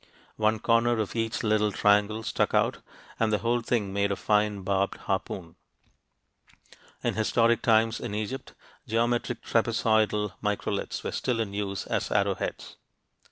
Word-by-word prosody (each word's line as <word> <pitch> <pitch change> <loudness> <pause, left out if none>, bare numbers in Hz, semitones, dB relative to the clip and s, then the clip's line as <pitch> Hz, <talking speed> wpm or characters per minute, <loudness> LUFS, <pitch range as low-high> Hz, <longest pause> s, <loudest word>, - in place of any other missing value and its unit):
One 110 0 +2
corner 115 +2 +2
of 110 0 -2
each 115 0 -1
little 105 -1 +2
triangle 105 +2 +2
stuck - - 0
out, - - +2 0.4
and 115 -1 +2
the 105 - +3
whole 120 +2 0
thing 110 -4 -1
made 100 0 +1
a - - +1
fine 105 -1 +1
barbed 100 +1 0
harpoon. 95 -3 -4 1.5
In - - +1
historic 115 +1 +2
times 115 0 +3
in 110 -4 -4
Egypt, 110 +5 -5 0.3
geometric 120 +1 0
trapezoidal 110 -3 +1
microliths 105 -1 -2
were - - -3
still 125 -3 -1
in 105 -3 -2
use 100 -1 -3
as - - -1
arrowheads. - - -1
110 Hz, 140 wpm, -27 LUFS, 105-115 Hz, 1.5 s, the